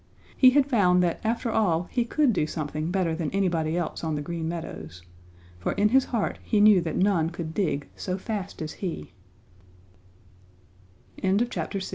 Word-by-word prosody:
He 260 - +7
had 275 +1 +4
found 185 -9 +3
that 170 -2 0
after 230 +1 -1
all 175 -7 +2
he 240 -2 0
could 275 0 +2
do 155 -5 0
something 155 0 -3
better 180 -3 0
than 160 -2 -2
anybody 170 -4 0
else 170 -1 -3
on 160 -2 -1
the 145 - -3
Green 165 +1 -4
Meadows, 85 - -7 0.6
for 85 - -1
in 210 +1 +2
his 265 +3 +4
heart 230 -4 -2
he 215 - 0
knew 205 -3 +6
that 165 -1 -3
none 180 -4 +2
could 170 -2 -6
dig 160 -8 -1
175 Hz, 140 wpm, -26 LUFS, 160-215 Hz, 0.6 s, He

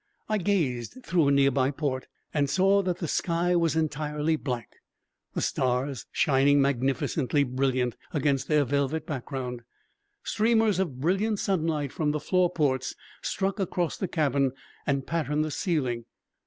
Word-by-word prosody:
I 215 -1 +1
gazed 165 - 0
through 170 -5 +2
a - - +4
nearby 140 -1 +3
port 135 -2 -2 0.3
and 145 -2 +1
saw 195 +6 +4
that 180 -2 -1
the 170 - -3
sky 175 +3 +1
was 165 -3 +2
entirely 150 0 0
black, 125 -7 -5 0.6
the - - 0
stars 130 -1 -1
shining 145 0 +4
magnificently 135 +2 +1
brilliant 130 -2 0 0.2
against 140 -4 0
their 150 -2 +3
velvet 140 +3 0
background. 130 -3 -4 0.6
Streamers 220 -3 +2
of 155 -10 -2
brilliant 195 +7 +1
sunlight 160 -8 0
from 150 -2 0
the 150 - -1
floor 180 +4 +2
ports 135 -7 0 0.3
struck 195 +1 -1
across 175 -3 -1
the 190 - -3
cabin 140 -5 +1 0.3
and 140 -2 0
patterned 155 -1 0
the 155 - -4
ceiling. 130 - -1
150 Hz, 140 wpm, -27 LUFS, 135-170 Hz, 0.6 s, a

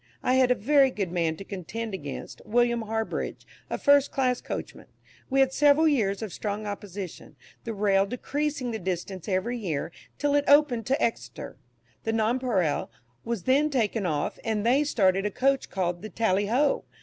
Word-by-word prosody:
I 255 - +2
had 260 -1 +4
a 250 - +4
very 275 +4 +4
good 195 -8 -3
man 165 -3 0
to - - -7
contend 200 +4 -6
against 145 -7 -7
William 240 +1 +2
Harbridge, 220 0 -3 0.2
a - - -2
first 285 -1 +4
class 255 -2 0
coachman. - - -6 0.4
We 270 0 +3
had 265 0 +3
several 295 +2 +5
years 220 -8 +1
of 210 - -6
strong 210 0 -4
opposition, 200 -5 -7 0.3
the 225 -2 -4
rail 200 -1 +2
decreasing 275 +2 -2
the 220 - -3
distance 185 -1 -4
every 200 +6 -1
year, 165 -6 -3 0.3
till 290 0 +1
it 290 0 +2
opened 285 -6 +4
to 270 +4 +1
Exeter. 120 - -3 0.5
The 225 - -1
"Nonpareil" 225 - 0 0.3
was 230 -5 -3
then 280 +4 +3
taken 225 -7 0
off, 150 -3 -2
and 220 -2 -1
they 265 +5 +4
started 195 -9 +2
a - - -1
coach 270 +5 +1
called 175 -2 -2
the 215 - -7
"Tally 205 -1 +1
Ho!" 275 +6 +1
225 Hz, 175 wpm, -27 LUFS, 195-260 Hz, 0.5 s, several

